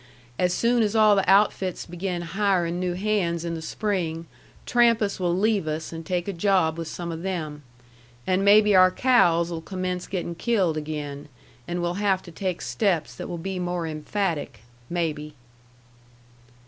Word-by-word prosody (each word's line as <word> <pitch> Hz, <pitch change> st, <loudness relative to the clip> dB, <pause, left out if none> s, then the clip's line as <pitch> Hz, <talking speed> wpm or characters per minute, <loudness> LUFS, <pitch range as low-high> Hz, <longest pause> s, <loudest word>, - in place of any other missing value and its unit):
As 180 Hz, -1 st, +2 dB
soon 235 Hz, +5 st, +2 dB
as 215 Hz, 0 st, 0 dB
all 215 Hz, -1 st, +6 dB
the 195 Hz, -, +1 dB
outfits 195 Hz, -2 st, +2 dB
begin 175 Hz, 0 st, -4 dB
hirin' 180 Hz, -1 st, 0 dB
new 180 Hz, -1 st, -1 dB
hands 180 Hz, -4 st, 0 dB
in 170 Hz, -, -2 dB
the 165 Hz, -, -5 dB
spring, 170 Hz, -3 st, -2 dB, 0.4 s
Trampas 230 Hz, -5 st, +2 dB
will 175 Hz, -1 st, 0 dB
leave 205 Hz, -4 st, +1 dB
us 155 Hz, +2 st, -4 dB
and 165 Hz, 0 st, -6 dB
take 175 Hz, +2 st, -2 dB
a 200 Hz, -, -2 dB
job 175 Hz, -3 st, +2 dB
with 165 Hz, -, -4 dB
some 170 Hz, +1 st, -5 dB
of 165 Hz, 0 st, -6 dB
them. 160 Hz, -6 st, -4 dB, 0.6 s
And 185 Hz, +1 st, +1 dB
maybe 210 Hz, +1 st, +6 dB
our 185 Hz, 0 st, +7 dB
cows'll 170 Hz, -8 st, +3 dB
commence 185 Hz, 0 st, -4 dB
gettin' 175 Hz, -2 st, -3 dB
killed 185 Hz, -3 st, +1 dB
again, 150 Hz, -2 st, -5 dB, 0.4 s
and 175 Hz, 0 st, -2 dB
we'll 175 Hz, +3 st, -2 dB
have 195 Hz, -2 st, +1 dB
to 175 Hz, -, -11 dB
take 185 Hz, +1 st, -3 dB
steps 190 Hz, -7 st, 0 dB
that -, -, -7 dB
will 175 Hz, -, -4 dB
be 190 Hz, +2 st, -4 dB
more 175 Hz, -1 st, -2 dB
emphatic 155 Hz, -, -3 dB, 0.3 s
maybe." 150 Hz, -3 st, -3 dB
180 Hz, 160 wpm, -25 LUFS, 165-200 Hz, 0.6 s, our